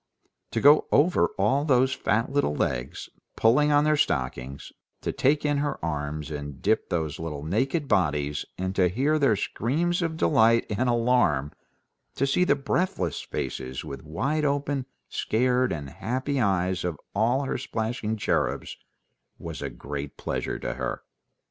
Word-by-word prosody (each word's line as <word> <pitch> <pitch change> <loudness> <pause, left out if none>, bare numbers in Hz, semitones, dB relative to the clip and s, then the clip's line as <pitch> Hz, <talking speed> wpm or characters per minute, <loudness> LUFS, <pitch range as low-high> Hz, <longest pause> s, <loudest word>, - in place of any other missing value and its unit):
To - - +1
go 145 +2 +6
over 145 - +4
all 120 +9 +2
those 130 -3 +3
fat 115 +4 0
little 140 - +1
legs, 65 -2 -2 0.3
pulling 145 +7 +4
on 145 0 +5
their 155 0 +3
stockings, 65 - -2 0.3
to - - -2
take 145 +3 +1
in 145 -1 +2
her 145 -1 -1
arms 75 -1 -3
and 75 -2 -6
dip 110 +2 +1
those 80 -5 -2
little 75 -3 -5
naked 135 - 0
bodies, 75 - +1
and 95 +1 -3
to 90 -2 +3
hear 140 - +1
their 135 -7 +4
screams 165 - -1
of 165 -1 -2
delight 115 -7 +4
and 125 +4 +1
alarm, 115 - +2 0.6
to 135 - +1
see 140 +6 +2
the 140 - +4
breathless 140 - -1
faces 65 +2 -5
with 70 -3 -7
wide 130 - -1
open, 140 -2 0 0.2
scared, 125 +2 +1
and 70 -4 -5
happy 130 +5 -2
eyes 95 -3 +1
of 85 -4 -3
all 120 +7 +2
her 135 - -2
splashing 110 -1 -2
cherubs, - - -1 0.6
was - - -7
a - - -3
great 70 0 -6
pleasure - - -3
to - - -4
her. - - -4
115 Hz, 155 wpm, -26 LUFS, -, 0.6 s, go